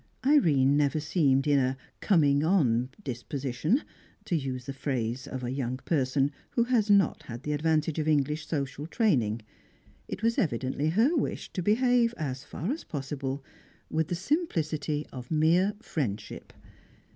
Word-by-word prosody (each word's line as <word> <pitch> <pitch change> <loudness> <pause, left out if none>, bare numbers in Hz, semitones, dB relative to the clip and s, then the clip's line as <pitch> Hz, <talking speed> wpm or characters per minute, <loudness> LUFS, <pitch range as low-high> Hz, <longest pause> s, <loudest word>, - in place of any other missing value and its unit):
Irene 150 - +4
never 145 +1 +2
seemed 145 -3 +2
in 145 -1 +4
"a 130 0 0 0.2
coming 145 -7 +3
on 130 -9 +2
disposition," 135 - -1 0.4
to 175 - 0
use 130 -5 -3
the 135 - -5
phrase 125 -2 -2
of 130 -1 -5
a 120 - -2
young 130 -2 -2
person 135 -1 +1 0.2
who 235 - +3
had 235 -3 +1
not 200 -1 +3 0.2
the 150 - -2
advantage 155 +1 +1
of 155 - -1
English 150 +1 +1
social 140 -1 -3
training; 120 - +1 0.6
it - - -6
was 230 0 +2
evidently 140 - 0
her 230 - +3
wish 285 - -2
to 185 - -2
behave, 240 +4 +3
as 135 -3 -4
far 170 - -4
as 315 - -4
possible, 135 -2 -4 0.5
with 160 -1 +1
the 175 - -2
simplicity 160 - -1
of 125 -2 -8
mere 170 +6 +3
friendship. 115 -10 -4
150 Hz, 145 wpm, -28 LUFS, 135-175 Hz, 0.6 s, Irene